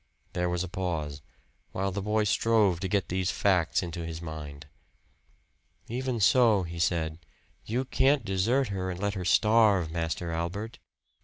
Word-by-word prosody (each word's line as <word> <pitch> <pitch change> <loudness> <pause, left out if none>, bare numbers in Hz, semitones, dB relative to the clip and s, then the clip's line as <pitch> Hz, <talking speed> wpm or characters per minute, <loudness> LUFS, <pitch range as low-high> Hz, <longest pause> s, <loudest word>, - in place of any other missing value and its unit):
There 90 0 0
was 90 0 -1
a - - -4
pause, 80 -5 -3 0.5
while 95 +1 -1
the 100 +2 -3
boy 105 +2 +1
strove 105 -3 +2
to 95 - -2
get 100 +1 0
these 95 +1 0
facts 95 -4 +1
into 85 -1 -5
his 80 -1 -5
mind. 75 -3 -8 1.2
"Even 125 0 -2
so," 110 -2 +4
he 85 0 -7
said, 80 -2 0 0.5
"you 125 +4 -1
can't 135 -1 +2
desert 110 +7 +1
her 95 -2 -3
and 90 -1 -5
let 100 0 -1
her 95 -3 -4
starve, 105 -5 +4
Master 85 +1 -3
Albert." 90 +7 -4
95 Hz, 155 wpm, -28 LUFS, 85-105 Hz, 1.2 s, so